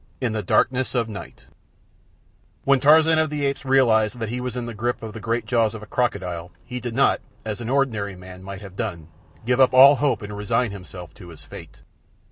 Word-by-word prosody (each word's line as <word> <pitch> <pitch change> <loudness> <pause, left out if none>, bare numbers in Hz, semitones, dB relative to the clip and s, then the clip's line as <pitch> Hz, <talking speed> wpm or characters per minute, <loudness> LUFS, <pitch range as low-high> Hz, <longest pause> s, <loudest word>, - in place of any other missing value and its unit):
In 125 -4 -1
the 110 - -1
Darkness 130 +7 +1
of 120 -2 +2
the 110 - -9
Night 100 - -10 1.2
When 140 -1 +4
Tarzan 160 +3 +5
of 160 -1 +1
the 145 -1 -2
Apes 140 0 -2
realized 125 -4 +3
that 115 -2 -4
he 125 +2 -3
was 125 0 -4
in 120 - -3
the 120 - -6
grip 120 +3 -3
of 110 -1 -6
the 110 - -7
great 115 +3 -2
jaws 115 -3 +1
of 110 - -8
a - - -8
crocodile 95 -7 -2
he 125 - -5
did 120 -1 -5
not, 140 - +3 0.2
as 110 +1 -4
an 115 - -5
ordinary 115 -8 0
man 90 0 -12
might 100 +1 -8
have 95 -2 -11
done, 85 -4 -5 0.4
give 125 +1 +1
up 130 -1 +5
all 135 +2 +9
hope 140 -5 0
and 105 0 -7
resign 105 +3 0
himself 90 -4 -10
to 90 - -13
his 80 - -12
fate. - - -12
115 Hz, 220 wpm, -23 LUFS, 100-130 Hz, 1.2 s, all